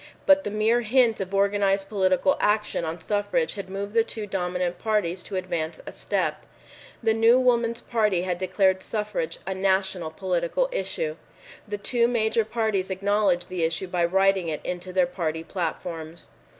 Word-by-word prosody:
But 290 Hz, 0 st, +6 dB
the -, -, -2 dB
mere 215 Hz, +3 st, +2 dB
hint 235 Hz, 0 st, +3 dB
of 190 Hz, -1 st, -4 dB
organized 200 Hz, 0 st, +2 dB
political 195 Hz, +6 st, +2 dB
action 210 Hz, -3 st, +1 dB
on 160 Hz, +2 st, -4 dB
suffrage 210 Hz, -, 0 dB
had 200 Hz, -3 st, -7 dB
moved 200 Hz, +2 st, -5 dB
the 230 Hz, -1 st, +4 dB
two 220 Hz, -1 st, -5 dB
dominant 180 Hz, -2 st, -2 dB
parties 205 Hz, -5 st, 0 dB
to 195 Hz, -, -7 dB
advance 170 Hz, -3 st, -3 dB
a -, -, -7 dB
step. -, -, -2 dB, 0.6 s
The 225 Hz, -1 st, +3 dB
new 225 Hz, +3 st, +5 dB
Woman's 235 Hz, -2 st, +2 dB
Party 210 Hz, -7 st, +1 dB
had 180 Hz, -1 st, -2 dB
declared 190 Hz, 0 st, +2 dB
suffrage 210 Hz, -6 st, -3 dB
a 190 Hz, -, -2 dB
national 190 Hz, -3 st, 0 dB
political 180 Hz, -, -1 dB
issue. -, -, -3 dB, 0.5 s
The 205 Hz, 0 st, -3 dB
two 235 Hz, +3 st, +2 dB
major 225 Hz, -1 st, +1 dB
parties 220 Hz, -4 st, -1 dB
acknowledged 190 Hz, -2 st, +1 dB
the 185 Hz, -2 st, -3 dB
issue 165 Hz, +3 st, 0 dB
by 180 Hz, -1 st, 0 dB
writing 190 Hz, 0 st, +2 dB
it 155 Hz, -2 st, -3 dB
into 180 Hz, +1 st, -4 dB
their 185 Hz, -1 st, +3 dB
party 165 Hz, -3 st, -3 dB
platforms. 165 Hz, -2 st, -5 dB
195 Hz, 165 wpm, -25 LUFS, 180-220 Hz, 0.6 s, But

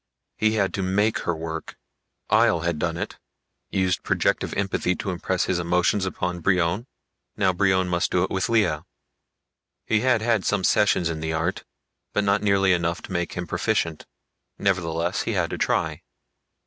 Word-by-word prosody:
He 110 Hz, 0 st, +2 dB
had 100 Hz, -3 st, +1 dB
to 100 Hz, -, -2 dB
make 100 Hz, +4 st, +1 dB
her 85 Hz, -, 0 dB
work. 80 Hz, 0 st, -6 dB, 0.5 s
Ihjel 85 Hz, -1 st, +4 dB
had 85 Hz, -3 st, -1 dB
done 85 Hz, 0 st, -1 dB
it -, -, -5 dB, 0.5 s
used 95 Hz, -2 st, 0 dB
projective -, -, 0 dB
empathy 95 Hz, -2 st, 0 dB
to 95 Hz, -, -3 dB
impress 90 Hz, 0 st, -1 dB
his 90 Hz, -2 st, 0 dB
emotions 90 Hz, +3 st, +1 dB
upon 90 Hz, 0 st, -3 dB
Brion. 90 Hz, +5 st, +1 dB, 0.5 s
Now 95 Hz, -2 st, +2 dB
Brion 95 Hz, 0 st, +2 dB
must 85 Hz, -1 st, 0 dB
do 90 Hz, -, +2 dB
it -, -, -2 dB
with 95 Hz, -1 st, 0 dB
Lea. 105 Hz, -9 st, +3 dB, 1.1 s
He 110 Hz, -, +2 dB
had 120 Hz, -2 st, +2 dB
had 115 Hz, -4 st, +2 dB
some 105 Hz, -2 st, 0 dB
sessions 95 Hz, -4 st, +3 dB
in 80 Hz, -1 st, -3 dB
the 80 Hz, 0 st, -2 dB
art, 85 Hz, +4 st, -2 dB, 0.5 s
but 105 Hz, -, +1 dB
not 100 Hz, +1 st, +2 dB
nearly 100 Hz, -2 st, +3 dB
enough 85 Hz, 0 st, -1 dB
to -, -, -9 dB
make 85 Hz, -2 st, -2 dB
him 90 Hz, -, -4 dB
proficient. 90 Hz, -2 st, -1 dB, 0.5 s
Nevertheless 85 Hz, -2 st, 0 dB
he -, -, -2 dB
had -, -, 0 dB
to -, -, -4 dB
try. -, -, 0 dB
95 Hz, 170 wpm, -24 LUFS, 85-100 Hz, 1.1 s, Ihjel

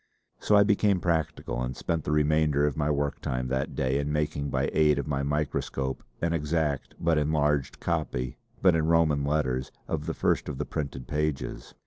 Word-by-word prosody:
So 105 Hz, -, +3 dB
I 100 Hz, -, +7 dB
became 100 Hz, -2 st, +3 dB
practical, 80 Hz, -7 st, -1 dB
and 60 Hz, 0 st, -3 dB
spent 80 Hz, -2 st, -2 dB
the -, -, -1 dB
remainder 75 Hz, -1 st, +3 dB
of 75 Hz, -3 st, 0 dB
my 75 Hz, 0 st, 0 dB
work 70 Hz, -1 st, -1 dB
time 65 Hz, 0 st, -2 dB
that 65 Hz, +1 st, -2 dB
day 65 Hz, +1 st, +1 dB
in 70 Hz, +1 st, -2 dB
making 75 Hz, -1 st, -1 dB
by -, -, 0 dB
aid 75 Hz, -2 st, +4 dB
of 70 Hz, -, -1 dB
my 70 Hz, -2 st, -1 dB
microscope 70 Hz, -2 st, -2 dB, 0.2 s
an 85 Hz, 0 st, +1 dB
exact 75 Hz, -2 st, -1 dB
but 80 Hz, -2 st, +2 dB
enlarged 75 Hz, -2 st, +1 dB
copy, 75 Hz, -7 st, -2 dB, 0.2 s
but 95 Hz, -2 st, +6 dB
in 80 Hz, -1 st, +1 dB
Roman 80 Hz, -4 st, +3 dB
letters, 70 Hz, -3 st, 0 dB, 0.2 s
of 80 Hz, -1 st, -3 dB
the 80 Hz, -, -2 dB
first -, -, +1 dB
of 70 Hz, -, -4 dB
the -, -, -2 dB
printed 70 Hz, -5 st, -4 dB
pages. 75 Hz, -1 st, -3 dB
75 Hz, 185 wpm, -28 LUFS, 70-80 Hz, 0.2 s, I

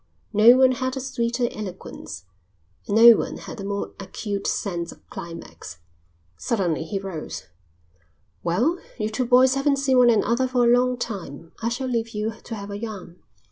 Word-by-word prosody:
No 225 Hz, +4 st, +7 dB
one 260 Hz, 0 st, +6 dB
had 260 Hz, +1 st, -2 dB
a -, -, -1 dB
sweeter 245 Hz, -2 st, -1 dB
eloquence, 185 Hz, -, -8 dB, 0.6 s
and 205 Hz, -, -1 dB
no 230 Hz, 0 st, +10 dB
one -, -, -3 dB
had -, -, -9 dB
a -, -, -6 dB
more 200 Hz, 0 st, -3 dB
acute 200 Hz, +1 st, -4 dB
sense 170 Hz, -4 st, -2 dB
of -, -, -17 dB
climax. 165 Hz, -, -9 dB, 0.6 s
Suddenly 175 Hz, -, -1 dB
he 195 Hz, +5 st, -3 dB
rose. 190 Hz, -5 st, -6 dB, 1.0 s
"Well, 245 Hz, -, +1 dB, 0.2 s
you 215 Hz, -2 st, -1 dB
two 220 Hz, +4 st, -1 dB
boys 255 Hz, +1 st, +6 dB
haven't 275 Hz, +1 st, +2 dB
seen 265 Hz, -2 st, +3 dB
one 245 Hz, -1 st, +6 dB
another 235 Hz, +3 st, +2 dB
for 250 Hz, -1 st, +1 dB
a 240 Hz, +1 st, +6 dB
long 250 Hz, 0 st, +1 dB
time. 170 Hz, -9 st, -6 dB
I 230 Hz, -, 0 dB
shall 255 Hz, +3 st, -3 dB
leave 230 Hz, -2 st, -2 dB
you 210 Hz, +1 st, -1 dB
to 230 Hz, -, -5 dB
have 200 Hz, -1 st, -7 dB
a 200 Hz, -, -5 dB
yarn. 205 Hz, -6 st, -8 dB
225 Hz, 175 wpm, -24 LUFS, 195-250 Hz, 1.0 s, no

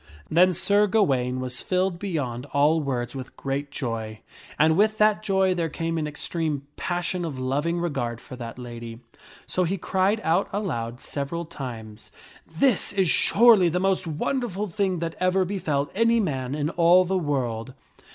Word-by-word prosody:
i 75 Hz, 0 st, -21 dB
Then 180 Hz, +3 st, +5 dB
Sir 205 Hz, +4 st, +3 dB
Gawaine 135 Hz, -, +1 dB
was 125 Hz, -1 st, -3 dB
filled 185 Hz, -1 st, 0 dB
beyond 145 Hz, -10 st, -3 dB
all 150 Hz, +3 st, +3 dB
words 125 Hz, -3 st, -3 dB
with 130 Hz, -1 st, -8 dB
great 140 Hz, +1 st, -3 dB
joy./ 110 Hz, -5 st, -4 dB, 0.4 s
And 160 Hz, +1 st, +4 dB
with 215 Hz, +3 st, +3 dB
that 215 Hz, 0 st, +3 dB
joy 190 Hz, -2 st, +2 dB
there 170 Hz, -2 st, -1 dB
came 165 Hz, +1 st, -2 dB
an 155 Hz, -, -2 dB
extreme 150 Hz, -1 st, -3 dB
passion 175 Hz, 0 st, -2 dB
of 155 Hz, -6 st, -4 dB
loving 145 Hz, +7 st, -1 dB
regard 135 Hz, -9 st, -2 dB
for 130 Hz, -, -10 dB
that 120 Hz, -2 st, -8 dB
lady. 120 Hz, -1 st, -8 dB, 0.4 s
So 185 Hz, -, 0 dB
he 185 Hz, +3 st, -1 dB
cried 190 Hz, +4 st, +1 dB
out 170 Hz, +5 st, +1 dB
aloud 125 Hz, -, -3 dB
several 155 Hz, +4 st, -4 dB
times, 115 Hz, -9 st, -8 dB, 0.2 s
" -, -, -24 dB
This 190 Hz, +7 st, +1 dB
is 190 Hz, -4 st, +2 dB
surely 215 Hz, -6 st, +5 dB
the 180 Hz, +2 st, 0 dB
most 190 Hz, -1 st, 0 dB
wonderful 210 Hz, -, -2 dB
thing 190 Hz, -1 st, -1 dB
that 165 Hz, -1 st, -3 dB
ever 185 Hz, +1 st, +2 dB
befell 160 Hz, -7 st, -2 dB
any 230 Hz, +3 st, +3 dB
man 135 Hz, -, -2 dB
in 150 Hz, +1 st, -1 dB
all 175 Hz, +2 st, +5 dB
the 190 Hz, +2 st, -1 dB
world." 130 Hz, -5 st, -2 dB
165 Hz, 170 wpm, -25 LUFS, 130-185 Hz, 0.4 s, Then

